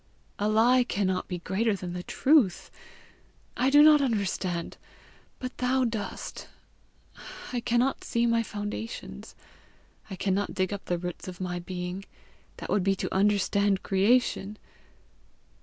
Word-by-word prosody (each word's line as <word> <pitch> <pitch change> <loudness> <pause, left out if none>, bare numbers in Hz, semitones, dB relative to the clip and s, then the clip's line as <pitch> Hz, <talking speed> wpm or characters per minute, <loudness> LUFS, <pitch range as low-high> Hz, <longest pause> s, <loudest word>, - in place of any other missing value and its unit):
A 205 +1 +1
lie 240 +4 +4
cannot 190 -5 -1
be 180 - -4
greater 200 +5 0
than 180 -2 -6
the 180 - -4
truth! 260 - +2 0.8
I 255 +2 +2
do 290 +2 +7
not 305 -1 +7
understand, 195 -8 -2 0.6
but 255 0 -6
thou 255 +1 +2
dost. 220 -5 -4 1.1
I 245 - 0
cannot 240 +3 0
see 235 0 0
my 230 -1 +3
foundations; 210 +1 -6 0.7
I 190 - -5
cannot 195 +2 -1
dig 185 0 0
up 200 - -6
the 175 - -1
roots 175 +1 -6
of 180 -1 -8
my 180 -1 -3
being: 180 +1 -5 0.5
that - - -6
would 205 - +2
be 195 +1 +2
to - - -4
understand 200 0 +2
creation! 210 0 +1
205 Hz, 135 wpm, -27 LUFS, 185-235 Hz, 1.1 s, do